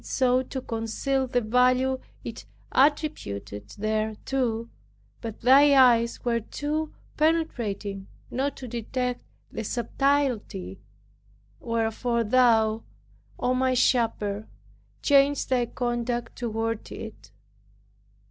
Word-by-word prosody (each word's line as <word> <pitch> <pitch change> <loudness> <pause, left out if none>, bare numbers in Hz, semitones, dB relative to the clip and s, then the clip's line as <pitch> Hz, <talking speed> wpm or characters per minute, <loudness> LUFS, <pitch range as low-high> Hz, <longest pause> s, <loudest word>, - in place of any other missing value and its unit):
It - - -14
sought 255 -1 +1
to 265 - -4
conceal 250 +4 -1
the 245 0 +1
value 250 +3 +2 0.2
it - - -8 0.2
attributed 105 - 0
thereto. 220 +3 -1 0.5
But 225 -2 -7
thy 275 +4 +6
eyes 235 -3 +4
were 235 -1 +2
too 300 +7 -3 0.3
penetrating 230 -12 -1 0.2
not 275 +3 -1
to 255 - -7
detect 245 +2 -3 0.3
the - - -4
subtilty. 240 - -1 0.8
Wherefore, 230 +1 0
thou, 225 -2 +3 0.6
O 250 - +1
my 255 0 +1
Shepherd, 220 -4 +1 0.6
changed 280 -1 +3
Thy 245 -2 +2
conduct 240 -1 -2
toward 225 -1 -3
it. 215 - -9
240 Hz, 100 wpm, -26 LUFS, 225-260 Hz, 0.8 s, thy